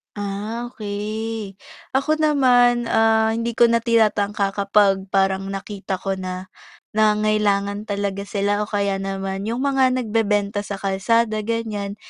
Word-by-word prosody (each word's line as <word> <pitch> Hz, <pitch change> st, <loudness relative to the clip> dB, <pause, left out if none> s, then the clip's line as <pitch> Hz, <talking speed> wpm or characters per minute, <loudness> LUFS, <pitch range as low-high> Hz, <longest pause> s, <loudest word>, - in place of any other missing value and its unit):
Ah, 205 Hz, +4 st, -4 dB
okey. 215 Hz, -1 st, -5 dB, 0.4 s
Ako 310 Hz, +3 st, +1 dB
naman, 245 Hz, -5 st, +4 dB
ah, 220 Hz, 0 st, +3 dB
hindi 230 Hz, +1 st, -2 dB
ko -, -, +4 dB
na 230 Hz, -, +3 dB
tinatangka 210 Hz, -3 st, +1 dB
kapag 200 Hz, -1 st, +2 dB
parang 195 Hz, 0 st, +1 dB
nakita 195 Hz, 0 st, -5 dB
ko 190 Hz, 0 st, -3 dB
na, 185 Hz, 0 st, -6 dB, 0.4 s
nangangailangan 210 Hz, -1 st, +1 dB
talaga 200 Hz, -1 st, -3 dB
sila 205 Hz, 0 st, 0 dB
o 210 Hz, -, -2 dB
kaya 200 Hz, -2 st, -1 dB
naman 195 Hz, +1 st, -4 dB
yung 240 Hz, +4 st, -2 dB
mga 265 Hz, -2 st, +2 dB
nagbebenta 210 Hz, -3 st, 0 dB
sa 200 Hz, -, -3 dB
kalsada 215 Hz, +3 st, 0 dB
ganiyan, 210 Hz, -3 st, -3 dB
210 Hz, 130 wpm, -21 LUFS, 200-225 Hz, 0.4 s, naman